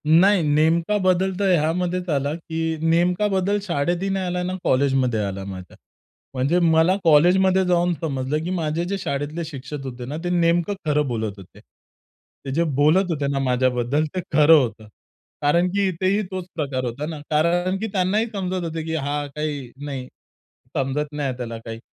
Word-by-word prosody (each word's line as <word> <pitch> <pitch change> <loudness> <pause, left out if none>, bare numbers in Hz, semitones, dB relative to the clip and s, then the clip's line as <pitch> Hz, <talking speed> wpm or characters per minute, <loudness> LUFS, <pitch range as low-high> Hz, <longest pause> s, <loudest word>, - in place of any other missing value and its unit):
नाही 180 +5 +5
नेमका 160 +6 +2
बदल 185 -1 +2
तर 200 -1 +2
ह्यामध्येच 180 +3 -1
आला 140 -1 0
की 165 -1 -3
नेमका 175 +4 +2
बदल 195 +1 +1
शाळेतही 175 +1 -1
नाही 190 -1 -1
आला, 180 0 -2
ना 180 +1 -2
कॉलेजमध्ये 130 -3 +2
आला 100 -1 -4
माझ्या. 95 -2 -9 0.6
म्हणजे 135 +7 +1
मला 165 +1 +4
कॉलेजमध्ये 185 +4 +5
जाऊन 175 0 +2
समजलं 145 0 -2
की 170 - -3
माझे 165 -2 -1
जे 200 +2 -2
शाळेतले 150 0 -3
शिक्षक 145 -1 -7
होते 125 -2 -6
ना 145 +5 -5
ते 175 - -1
नेमकं 175 +1 +2
खरं 150 -1 +1
बोलत 110 -4 -2
होते. 95 -2 -14
ते 135 - -15
जे 165 +4 +2
बोलत 170 +6 +3
होते 145 -3 -1
ना 140 - -1
माझ्याबद्दल 130 +2 +1
ते 185 - 0
खरं 150 +2 +6
होतं. 115 -5 -1 0.5
कारण 170 +5 +3
की 200 0 +1
इथेही 185 +3 0
तोच 185 -1 -4
प्रकार 140 -5 -2
होता 125 +5 -4
ना 160 -2 -6
कारण 175 +4 +1
की 220 - -2
त्यांनाही 195 +3 +1
समजत 185 -2 -2
होते 165 -1 -4
की 160 0 -2
हा 145 -1 -2
काही 145 -5 -4
नाही 135 -3 -5 0.7
समजत 145 +3 -1
नाही 145 -1 -2
आहे 130 -2 -4
त्याला 115 -2 -5
काही. 115 -1 -6
160 Hz, 170 wpm, -22 LUFS, 140-180 Hz, 0.7 s, खरं